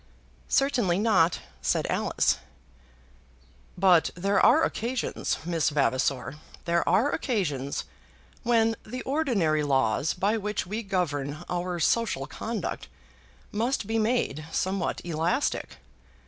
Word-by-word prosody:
"Certainly 240 Hz, -10 st, +2 dB
not," 190 Hz, -6 st, +3 dB, 0.2 s
said -, -, +1 dB
Alice. -, -, +1 dB, 1.4 s
"But 175 Hz, -3 st, +5 dB
there 195 Hz, +3 st, +1 dB
are 320 Hz, -, +6 dB
occasions, 245 Hz, -2 st, -1 dB
Miss 165 Hz, -2 st, +1 dB
Vavasor; 135 Hz, -2 st, 0 dB, 0.3 s
there 170 Hz, 0 st, +1 dB
are 215 Hz, +11 st, +3 dB
occasions 145 Hz, -, -1 dB, 0.6 s
when 225 Hz, -1 st, +2 dB
the 250 Hz, +3 st, -6 dB
ordinary 230 Hz, -, +1 dB
laws 135 Hz, -1 st, +1 dB
by 200 Hz, +5 st, +1 dB
which 210 Hz, -1 st, -2 dB
we 210 Hz, +5 st, -3 dB
govern 160 Hz, -6 st, -2 dB
our 175 Hz, 0 st, -2 dB
social 215 Hz, -8 st, +1 dB
conduct 220 Hz, -, -4 dB, 0.6 s
must 235 Hz, +2 st, 0 dB
be 225 Hz, +2 st, 0 dB
made 215 Hz, -, 0 dB
somewhat 190 Hz, 0 st, -1 dB
elastic." 165 Hz, 0 st, -1 dB
185 Hz, 105 wpm, -27 LUFS, 155-225 Hz, 1.4 s, are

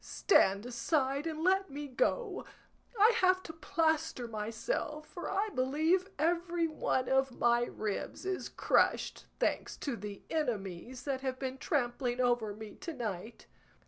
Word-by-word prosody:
Stand 200 Hz, -, +3 dB
aside 270 Hz, +4 st, 0 dB
and 315 Hz, 0 st, -3 dB
let 385 Hz, +1 st, +3 dB
me 290 Hz, +1 st, -5 dB
go; 390 Hz, -, 0 dB, 0.6 s
I 435 Hz, +3 st, +7 dB
have 370 Hz, -2 st, +4 dB
to 320 Hz, -, -7 dB
plaster 320 Hz, -5 st, 0 dB
myself, 230 Hz, -, -3 dB
for 350 Hz, -, -6 dB
I 405 Hz, +3 st, 0 dB
believe 315 Hz, +9 st, +2 dB
every 340 Hz, +2 st, +1 dB
one 260 Hz, -4 st, 0 dB
of 265 Hz, -1 st, +2 dB
my 240 Hz, 0 st, +3 dB
ribs 215 Hz, -, -4 dB
is 380 Hz, 0 st, -2 dB
crushed, -, -, +1 dB
thanks -, -, 0 dB
to 275 Hz, -5 st, -3 dB
the 205 Hz, -1 st, -7 dB
enemies 240 Hz, -, -2 dB
that 270 Hz, -2 st, -2 dB
have 260 Hz, -1 st, -2 dB
been 265 Hz, 0 st, -4 dB
trampling 245 Hz, -3 st, 0 dB
over 240 Hz, -4 st, +2 dB
me 215 Hz, -1 st, -8 dB
to 335 Hz, -, -5 dB
night." 220 Hz, -, -5 dB
270 Hz, 145 wpm, -33 LUFS, 240-330 Hz, 0.6 s, I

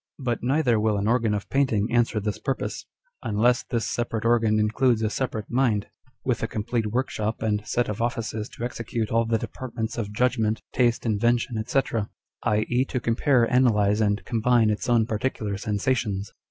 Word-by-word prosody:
But 120 Hz, -4 st, -2 dB
neither 125 Hz, -3 st, +2 dB
will 105 Hz, -1 st, +1 dB
an 100 Hz, +1 st, -1 dB
organ 115 Hz, -2 st, +2 dB
of 100 Hz, -, -4 dB
painting 120 Hz, -6 st, +2 dB
answer 120 Hz, -2 st, +2 dB
this 105 Hz, 0 st, -3 dB
purpose, 135 Hz, -, -3 dB, 0.3 s
unless 115 Hz, +4 st, +2 dB
this 115 Hz, -2 st, -2 dB
separate 115 Hz, -2 st, -2 dB
organ 115 Hz, -2 st, +3 dB
includes 110 Hz, +2 st, +2 dB
a 110 Hz, -, 0 dB
separate 110 Hz, -5 st, -2 dB
mind, 120 Hz, -5 st, +1 dB, 0.4 s
with 125 Hz, -4 st, 0 dB
a 115 Hz, -, 0 dB
complete 110 Hz, +1 st, -2 dB
workshop 110 Hz, -2 st, -2 dB
and 105 Hz, -2 st, 0 dB
set 120 Hz, 0 st, 0 dB
of 105 Hz, +1 st, -4 dB
offices 115 Hz, -2 st, -2 dB
to -, -, -5 dB
execute 115 Hz, -2 st, -3 dB
all 115 Hz, 0 st, +2 dB
the 115 Hz, 0 st, +1 dB
departments 115 Hz, -1 st, -5 dB
of 105 Hz, -3 st, -3 dB
judgment, 110 Hz, -1 st, 0 dB
taste, 120 Hz, -2 st, +2 dB
invention, 115 Hz, +1 st, +1 dB
&c., 135 Hz, +2 st, +3 dB, 0.6 s
i.e., 110 Hz, +4 st, +1 dB
to 130 Hz, -, -2 dB
compare, 120 Hz, +2 st, +2 dB
analyse, 110 Hz, -4 st, +3 dB
and 105 Hz, -1 st, +1 dB
combine 115 Hz, -1 st, +3 dB
its 105 Hz, -, -3 dB
own 115 Hz, -2 st, +4 dB
particular 110 Hz, -2 st, -2 dB
sensations. 105 Hz, -1 st, -1 dB
115 Hz, 165 wpm, -25 LUFS, 105-120 Hz, 0.6 s, own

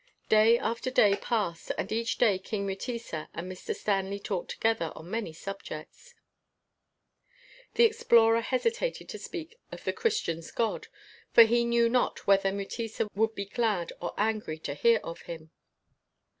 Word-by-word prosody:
Day 220 Hz, +2 st, +6 dB
after 235 Hz, +3 st, -2 dB
day 205 Hz, -6 st, +5 dB
passed, 205 Hz, -7 st, -2 dB
and -, -, -3 dB
each 230 Hz, +1 st, -1 dB
day 205 Hz, -6 st, +3 dB
King 200 Hz, +1 st, -3 dB
Mutesa 195 Hz, -4 st, -4 dB
and 170 Hz, -, -4 dB
Mr. 185 Hz, -, -5 dB
Stanley 195 Hz, -1 st, -1 dB
talked 200 Hz, -2 st, -4 dB
together 225 Hz, -8 st, 0 dB
on 165 Hz, +4 st, -10 dB
many 225 Hz, -6 st, -2 dB
subjects. 195 Hz, -, -9 dB, 1.6 s
The 470 Hz, -, +5 dB
explorer 235 Hz, -, +5 dB
hesitated 460 Hz, -, -1 dB
to -, -, -6 dB
speak 350 Hz, +7 st, -7 dB
of -, -, -9 dB
the -, -, -1 dB
Christian's 165 Hz, -, -1 dB
God, 230 Hz, -2 st, -1 dB, 0.5 s
for 230 Hz, -, +10 dB
he 235 Hz, +1 st, +3 dB
knew 235 Hz, 0 st, +3 dB
not 245 Hz, +1 st, 0 dB
whether 195 Hz, -1 st, +4 dB
Mutesa 215 Hz, +2 st, -3 dB
would 220 Hz, +2 st, +1 dB
be 200 Hz, -, -3 dB
glad 205 Hz, -4 st, -1 dB
or 175 Hz, -, -4 dB
angry 210 Hz, -7 st, -1 dB
to 140 Hz, -, -3 dB
hear 230 Hz, +10 st, +4 dB
of 165 Hz, -, -7 dB
Him. 160 Hz, -1 st, -8 dB
220 Hz, 150 wpm, -29 LUFS, 195-235 Hz, 1.6 s, for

